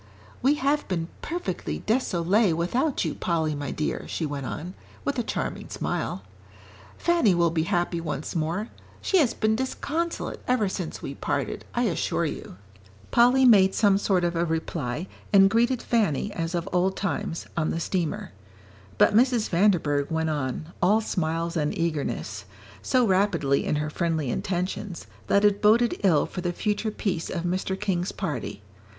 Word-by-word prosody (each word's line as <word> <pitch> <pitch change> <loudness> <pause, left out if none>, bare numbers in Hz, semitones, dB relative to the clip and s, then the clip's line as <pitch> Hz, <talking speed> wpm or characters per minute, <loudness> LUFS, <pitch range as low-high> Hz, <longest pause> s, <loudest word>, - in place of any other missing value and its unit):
"We 275 +3 +4
have 290 +1 0
been 170 -3 -2
perfectly 330 - -4
désolée 200 -4 +2
without 245 - 0
you, - - -1
Polly, 160 -3 0
my 145 -2 -4
dear," 150 - -3
she 165 - -2
went 140 -3 -4
on, 175 +4 -5 0.3
with 280 -3 0
a - - +1
charming - - -4
smile. - - -3 0.7
"Fanny 335 - +3
will 170 -1 +3
be 160 -1 0
happy 175 -1 0
once 155 -1 -4
more. 170 +7 -1 0.3
She 380 - +2
has 275 -7 +2
been 220 0 +2
disconsolate 305 +7 -3
ever 250 -5 +2
since 180 -3 -5
we 140 - -4
parted, - - -3
I - - +2
assure - - 0
you." - - -6 0.5
Polly 250 +2 +5
made 195 -5 +6
some 200 -2 +4
sort 190 -3 +1
of 175 0 0
a 170 - +1
reply, 160 -3 -2 0.3
and 195 -1 +6
greeted 240 +2 +2
Fanny, 205 - +1
as 165 -1 -2
of 170 -1 -2
old 185 +2 +2
times, 165 -3 -2
on 155 -2 0
the 165 - -1
steamer; 170 -2 -2 0.7
but - - +5
Mrs. 240 0 +3
Vanderburgh 170 -7 +2
went 160 -1 0
on, 150 +3 -3
all 210 +5 +4
smiles 165 -4 -2
and 150 -2 0
eagerness 145 -11 -2 0.4
so 255 -2 +2
rapidly 185 -8 +2
in - - 0
her 150 +1 -2
friendly 160 -6 -1
intentions, 185 - -3 0.2
that 200 +1 +4
it 205 -1 +3
boded 230 +3 +4
ill 170 -7 +4
for 180 - -6
the 175 0 -1
future 210 +3 -1
peace 190 -5 -2
of 170 - -3
Mr. 185 +2 -1
King's 185 -3 -1
party. 125 - -4
180 Hz, 160 wpm, -26 LUFS, 160-215 Hz, 0.7 s, made